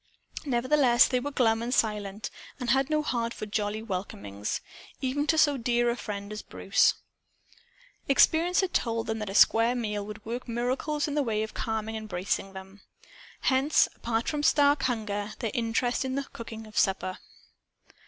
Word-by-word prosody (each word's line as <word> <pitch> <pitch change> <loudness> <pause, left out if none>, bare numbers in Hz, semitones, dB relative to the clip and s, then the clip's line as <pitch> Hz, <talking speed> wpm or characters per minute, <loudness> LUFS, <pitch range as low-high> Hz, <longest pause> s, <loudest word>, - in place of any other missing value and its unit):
Nevertheless 255 -1 +4
they 250 - +1
were 280 +3 -3
glum 225 -5 +2
and 235 +1 -3
silent 210 -3 -1 0.3
and 245 -2 0
had 270 +2 +2
no 305 -1 +1
heart 235 -5 -2
for - - -5
jolly 210 +1 -2
welcomings, 105 - -4 0.4
even 285 +3 -1
to 320 - +3
so 290 -3 +4
dear 240 0 +1
a - - -2
friend 205 -3 -6
as 210 - -5
Bruce. 195 - +2 1.1
Experience 330 +7 +4
told 230 -1 0
them 220 0 -2
that 210 -2 -4
a 195 - -5
square 230 +3 +5
meal 210 -4 -2
would 210 +1 -9
work 245 +3 -5
miracles 255 +6 -1
in 290 - -3
the 295 - +2
way 220 -5 0
of 220 - -6
calming 220 0 -3
and 220 -1 -6
bracing 195 +1 -2
them. 190 +1 -11 0.6
Hence, 270 +3 +3
apart 230 0 -2
from 300 -1 -1
stark 290 -1 +4
hunger, 210 -4 -2
their 225 -4 -3
interest 235 +2 0
in 260 0 -3
the 280 - -1
cooking 225 -1 -8
of 215 -1 -14
supper. 190 -1 0
230 Hz, 170 wpm, -28 LUFS, 210-260 Hz, 1.1 s, square